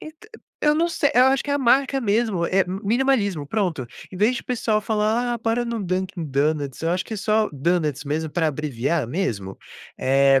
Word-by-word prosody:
Ent 310 0 -10 0.5
eu 300 0 +3
não 335 +2 +2
sei, 320 -3 +1
eu 250 +1 +6
acho 270 0 +2
que 290 - -4
é - - +2
a - - +1
marca 270 +1 +3
mesmo, 215 -5 +1
é 190 +2 +2
minimalismo, 200 - 0
pronto. 175 - -1 0.2
Em 185 - -9
vez 215 +6 +3
de - - -3
o - - -34
pessoal 225 -3 0
falar: 220 +3 0
"Ah, - - -4
bora 230 +2 0
no 235 -2 -3
Dunkin 185 -1 -2
Donuts", 145 -1 -1
eu 165 - 0
acho 180 +2 0
que 225 - -6
é - - -4
só 215 +1 +1
Donuts 150 -1 0
mesmo, 155 +2 -2
para 165 +1 0
abreviar 145 -1 -1
mesmo. 110 - -3 0.4
É 135 +1 +4
195 Hz, 210 wpm, -23 LUFS, 150-235 Hz, 0.5 s, eu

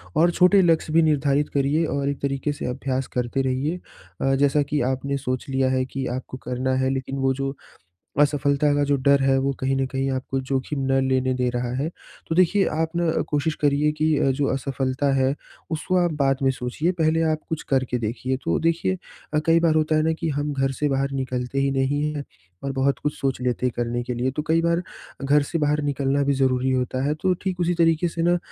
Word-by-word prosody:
और 170 +2 +4
छोटे 180 +3 +5
लक्ष्य 165 -3 +2
भी 165 - +6
निर्धारित 145 -1 +2
करिए 145 +4 +1
और 140 -2 -1
एक 140 - -3
तरीक़े 140 +1 -1
से 145 - -6
अभ्यास 130 +1 -2
करते 125 +2 -1
रहिए 135 +6 -1 0.4
अ, 135 0 +2
जैसा 145 +1 +3
कि 145 +1 -1
आपने 140 +1 -2
सोच 130 -2 -3
लिया 130 -1 +1
है 130 0 +1
कि 135 0 -4
आपको 130 0 -7
करना 130 +1 -1
है 130 - +2
लेकिन 135 0 -3
वो 135 0 +2
जो 135 +1 -3 0.6
असफ़लता 145 0 +3
का 145 - +2
जो 145 - +2
डर 140 0 +5
है, 135 0 +3
वो 135 +1 0
कहीं 135 +1 0
न 135 - +1
कहीं 135 0 -1
आपको 130 +1 -2
ज़ोखिम 135 +2 -2
ना 135 0 +3
लेने 130 -1 +1
दे 125 -1 0
रहा 120 0 -2
है। 140 +5 -1 0.4
तो 160 - -1
देखिए, 185 +2 +4
आप 160 +2 -2
ना 170 -1 +1 0.2
कोशिश 155 +1 0
करिए 145 +1 +3
कि 155 0 +3
अ, 135 - +2
जो 140 +1 0
असफ़लता 135 +1 -1
है, 135 +1 +2 0.4
उसको 160 +3 -1
आप 175 -2 +2
बाद 135 -1 +3
में 135 - +4
सोचिए, 130 +7 -2
पहले 160 +1 +3
आप 155 - -1
कुछ 160 - -3
करके 130 -2 +1
देखिए। 125 +4 -2
तो 85 - +1
देखिए 165 +3 0 0.4
अ, 150 - +3
कई 165 0 +5
बार 165 -2 +2
होता 155 0 +2
है 155 - +3
ना 160 0 +2
कि 165 - 0
हम 145 0 -2
घर 135 -1 0
से 145 +3 -1
बाहर 135 0 0
निकलते 130 0 -2
ही 135 0 +1
नहीं 135 +2 0
हैं 145 -1 -4 0.4
और 140 - -2
बहुत 135 +1 +1
कुछ 150 - 0
सोच 135 -2 -1
लेते 125 0 -1
हैं 125 - +1
करने 120 0 -1
के 125 +1 -3
लिए, 125 +2 -1
तो 145 - -3
कई 165 +1 +3
बार, 170 +1 +1 0.4
घर 145 +2 +4
से 165 - -3
बाहर 150 0 +1
निकलना 140 0 0
भी 140 - +2
ज़रूरी 130 -1 +1
होता 130 0 -1
है, 145 - +1
तो 185 +4 +1
ठीक 185 -2 -3
उसी 175 0 +1
तरीक़े 165 0 +3
से 165 - -4
ना 175 +1 +3
140 Hz, 225 wpm, -23 LUFS, 130-155 Hz, 0.6 s, भी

